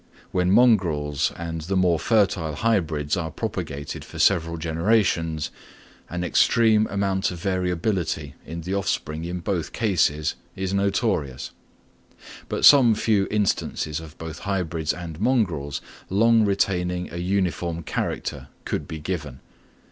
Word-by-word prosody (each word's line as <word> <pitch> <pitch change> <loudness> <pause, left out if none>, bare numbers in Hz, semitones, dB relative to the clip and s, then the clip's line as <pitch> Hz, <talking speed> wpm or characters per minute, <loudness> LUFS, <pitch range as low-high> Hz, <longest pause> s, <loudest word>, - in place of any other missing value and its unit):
When 90 -1 +1
mongrels 85 - +3
and 80 -1 -4
the 95 +5 -1
more 90 -3 +3
fertile 95 -8 +1
hybrids 80 -8 0
are 85 -3 -2
propagated 70 -1 -5
for - - -11
several 85 -3 +2
generations, 80 -1 +1 0.6
an 90 0 -3
extreme 110 +4 +4
amount 95 -1 0
of 90 - -6
variability 90 -4 -1
in 85 +2 -6
the 90 +4 -4
offspring 80 -5 -2
in 90 +1 -4
both 85 -3 -2
cases 85 -9 +1 0.2
is 95 0 -3
notorious; 100 - 0 1.0
but - - +1
some 125 -6 +8
few 105 -3 +2
instances 100 -7 -1
of 80 -1 -11
both 80 -2 -7
hybrids 85 -5 -1
and 85 -3 -7
mongrels 85 - 0 0.3
long 115 +3 +4
retaining 90 -3 0
a - - -5
uniform 85 -2 -1
character - - -3 0.2
could - - -3
be 80 - -5
given. 75 -5 -5
90 Hz, 125 wpm, -24 LUFS, 80-100 Hz, 1.0 s, some